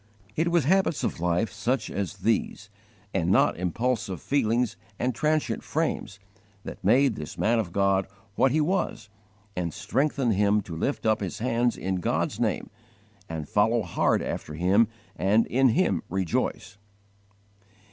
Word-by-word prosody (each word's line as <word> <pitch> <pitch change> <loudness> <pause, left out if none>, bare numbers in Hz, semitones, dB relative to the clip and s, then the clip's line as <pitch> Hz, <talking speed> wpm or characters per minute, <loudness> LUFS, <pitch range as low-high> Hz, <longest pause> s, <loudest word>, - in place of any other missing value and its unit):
It 160 +2 +1
was 170 -3 +3
habits 185 +1 +2
of - - -2
life 90 +5 0
such 110 +2 -1
as 100 -1 -3
these, 110 -2 -1 0.4
and 90 -3 0
not - - +4
impulsive 100 +2 -1
feelings 120 - +1 0.2
and 125 +1 0
transient 155 +5 0
frames, 150 -10 -2 0.5
that - - -9
made 125 +6 +4
this 75 -4 -7
man 115 +2 +2
of 100 -6 -2
God 100 0 +2 0.3
what 130 +5 +3
he 155 +3 +2
was 175 - -1 0.5
and 85 -2 -2
strengthened 135 - 0
him 105 +1 +3
to 90 -4 -8
lift 135 - -2
up 110 -1 +3
his 95 -3 -4
hands 120 0 0
in 95 0 -2
God's 90 - -1
name, - - -1 0.6
and 80 -2 -5
follow 110 +5 +2
hard 90 - +1
after 75 - -5
Him 95 +7 +3 0.3
and 105 +5 +3
in 130 +2 +3
Him 175 +10 +2
rejoice. 95 +2 -2
110 Hz, 145 wpm, -26 LUFS, 95-130 Hz, 0.6 s, not